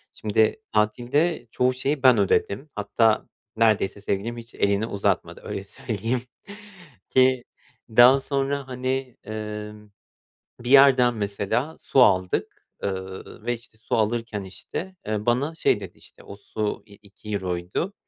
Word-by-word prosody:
Şimdi 110 - +1
tatilde 120 +7 +1
çoğu 125 0 +2
şeyi 135 +2 -2
ben 125 -3 +7
ödedim. 100 +7 +1
Hatta 110 +2 +2 0.3
neredeyse 105 -3 +2
sevgilim 110 +4 -2
hiç 115 0 -11
elini 100 +1 +1
uzatmadı 100 - -1
öyle 100 - -5
söyleyeyim 115 +4 -3 0.9
ki 130 -1 +4 0.5
daha 120 +4 +7
sonra, 140 0 -2
hani, 130 0 -3
emm, 105 0 -7 0.7
bir 120 +1 -5
yerden, 135 -3 +7
mesela, 105 +8 -2
su 135 - +2
aldık, 95 -5 +1 0.2
eee, 100 - 0 0.5
ve, 120 - +1
işte, 115 -1 -14
su 110 - -2
alırken, 110 -1 -1
işte, 185 - -7
eee, 105 0 -2
bana 135 +7 +1
şey 105 - +2
dedi, 95 -3 -10
işte, - - -12
o 100 - -10
su, 105 +1 -4
i 105 - -16
iki 105 +1 -14
euroydu. 90 - -3
115 Hz, 135 wpm, -24 LUFS, 105-130 Hz, 0.9 s, ben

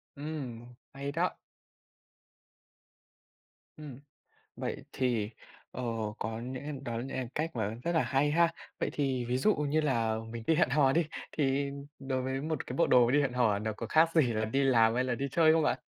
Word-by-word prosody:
Ừm, 130 -6 -6 0.2
hay 140 +1 -4
đó. 170 +4 -1 2.4
Ừm. 145 -5 -9 0.6
Vậy - - -4
thì, 120 -5 0 0.4
ờ, 125 - -6 0.4
có 110 0 -3
nhẽ 130 +4 -5
đó 120 - -4
nhẽ 130 +1 -4
cách 160 -2 -2
mà 110 -1 -1
rất 170 - 0
là 165 - +3
hay 140 +2 +1
ha! 170 +2 +4 0.3
Vậy - - 0
thì 135 -4 -1
ví 120 +1 0
dụ 210 +10 +3
như 150 +1 +1
là 115 -7 +1
mình 115 0 -6
đi 165 - +4
hẹn 160 -5 +3
hò 135 -1 +4
đi, 165 +1 +2 0.3
thì 140 -1 +1 0.3
đối 135 -1 -2
với 130 +1 -2
một 155 0 -3
cái 125 - -5
bộ 170 - +4
đồ 120 -1 +5
đi 145 +3 +4
hẹn 135 -3 -1
hò 115 -5 +2
nó 110 +1 -2
có 110 +2 -6
khác 160 +7 +4
gì 140 -8 +4
là 110 0 0
đi 135 +6 0
làm 115 -4 +4
hay 125 +1 +1
là 125 -1 0
đi 140 +4 -2
chơi 160 +2 +5
không 160 0 +3
bạn? - - +1
135 Hz, 190 wpm, -31 LUFS, 120-150 Hz, 2.4 s, đồ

